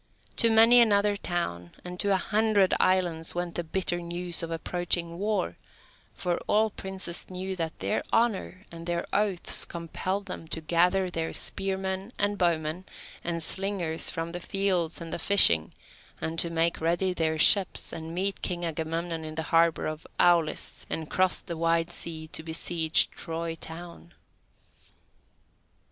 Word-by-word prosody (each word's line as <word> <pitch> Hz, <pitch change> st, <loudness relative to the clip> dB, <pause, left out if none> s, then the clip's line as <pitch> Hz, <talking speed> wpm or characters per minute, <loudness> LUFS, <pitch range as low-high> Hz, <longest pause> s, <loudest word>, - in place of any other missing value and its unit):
To 230 Hz, -, +5 dB
many 225 Hz, +2 st, +7 dB
another 205 Hz, -3 st, +4 dB
town 90 Hz, -, -4 dB
and 180 Hz, 0 st, -7 dB
to 200 Hz, -, 0 dB
a -, -, +4 dB
hundred 210 Hz, -1 st, +2 dB
islands 175 Hz, -4 st, +1 dB
went 175 Hz, -1 st, -3 dB
the 175 Hz, -, -3 dB
bitter 175 Hz, +1 st, -2 dB
news 175 Hz, 0 st, -1 dB
of 165 Hz, -, -4 dB
approaching 170 Hz, +1 st, -2 dB
war, 210 Hz, +1 st, -1 dB, 0.6 s
for 175 Hz, -2 st, -1 dB
all 215 Hz, +1 st, +3 dB
princes 190 Hz, -3 st, -4 dB
knew 185 Hz, +1 st, -5 dB
that 165 Hz, -2 st, -3 dB
their 215 Hz, -, -1 dB
honour 210 Hz, -4 st, 0 dB
and 165 Hz, 0 st, -9 dB
their 170 Hz, 0 st, -1 dB
oaths 200 Hz, -4 st, +1 dB
compelled 185 Hz, +4 st, -4 dB
them 180 Hz, -4 st, -8 dB
to 160 Hz, -, -5 dB
gather 180 Hz, +4 st, +2 dB
their 165 Hz, -1 st, -3 dB
spearmen, 190 Hz, +1 st, -1 dB
and 205 Hz, 0 st, 0 dB
bowmen, 170 Hz, 0 st, 0 dB, 0.4 s
and 170 Hz, -1 st, 0 dB
slingers 190 Hz, -4 st, 0 dB
from 165 Hz, +1 st, -4 dB
the 175 Hz, -, -5 dB
fields 180 Hz, -3 st, -1 dB
and 165 Hz, -1 st, -7 dB
the -, -, -3 dB
fishing, 160 Hz, -, +5 dB, 0.5 s
and 165 Hz, +1 st, -2 dB
to 170 Hz, -, +5 dB
make 165 Hz, 0 st, 0 dB
ready 175 Hz, +3 st, +1 dB
their 160 Hz, -2 st, 0 dB
ships, 190 Hz, +4 st, +4 dB
and 165 Hz, +1 st, -6 dB
meet 195 Hz, +2 st, -2 dB
King 175 Hz, -2 st, -2 dB
Agamemnon 165 Hz, +1 st, -3 dB
in 155 Hz, 0 st, -7 dB
the 160 Hz, -, -2 dB
harbour 165 Hz, 0 st, +3 dB
of 155 Hz, 0 st, -5 dB
Aulis, 170 Hz, -3 st, +2 dB
and 160 Hz, -1 st, -4 dB
cross 185 Hz, -1 st, +2 dB
the 170 Hz, -, -6 dB
wide 165 Hz, +1 st, +1 dB
sea 160 Hz, -2 st, -6 dB
to -, -, -4 dB
besiege 160 Hz, 0 st, +2 dB
Troy 165 Hz, 0 st, -4 dB
town. 170 Hz, +1 st, -9 dB
175 Hz, 155 wpm, -27 LUFS, 165-190 Hz, 0.6 s, many